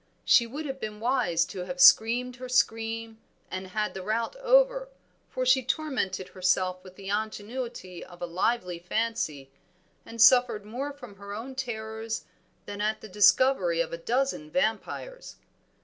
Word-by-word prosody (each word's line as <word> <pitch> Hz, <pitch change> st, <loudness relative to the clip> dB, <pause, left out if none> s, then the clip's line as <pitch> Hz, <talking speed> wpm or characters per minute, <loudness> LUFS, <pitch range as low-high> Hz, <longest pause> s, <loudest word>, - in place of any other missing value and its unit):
She 235 Hz, -, +5 dB
would 295 Hz, +6 st, -6 dB
have 270 Hz, -1 st, -5 dB
been 215 Hz, -2 st, -6 dB
wise 225 Hz, -8 st, +1 dB
to 185 Hz, -3 st, -6 dB
have 270 Hz, +7 st, -6 dB
screamed 250 Hz, -2 st, +5 dB
her 255 Hz, 0 st, -8 dB
scream 225 Hz, -2 st, 0 dB, 0.3 s
and 185 Hz, 0 st, -5 dB
had 210 Hz, +3 st, -2 dB
the 190 Hz, -, -6 dB
rout 220 Hz, -, -2 dB
over, -, -, +3 dB, 0.4 s
for 255 Hz, -, -2 dB
she 260 Hz, +1 st, +5 dB
tormented 245 Hz, -10 st, -2 dB
herself 185 Hz, 0 st, 0 dB
with 185 Hz, -1 st, -13 dB
the 195 Hz, 0 st, -9 dB
ingenuity 215 Hz, -2 st, -4 dB
of 175 Hz, -1 st, -14 dB
a 175 Hz, -, -3 dB
lively 180 Hz, +1 st, -1 dB
fancy, 180 Hz, -8 st, -2 dB, 0.5 s
and 230 Hz, -, -11 dB
suffered 240 Hz, -3 st, +5 dB
more 255 Hz, +7 st, -4 dB
from 250 Hz, -8 st, -12 dB
her 200 Hz, +1 st, -8 dB
own 240 Hz, +5 st, -7 dB
terrors 225 Hz, -3 st, -5 dB, 0.4 s
than 205 Hz, 0 st, -6 dB
at 215 Hz, +1 st, -1 dB
the 220 Hz, -, -10 dB
discovery 200 Hz, -3 st, +4 dB
of 170 Hz, 0 st, -1 dB
a -, -, -3 dB
dozen 245 Hz, -, -1 dB
vampires. 275 Hz, -, -3 dB
225 Hz, 155 wpm, -27 LUFS, 190-255 Hz, 0.5 s, She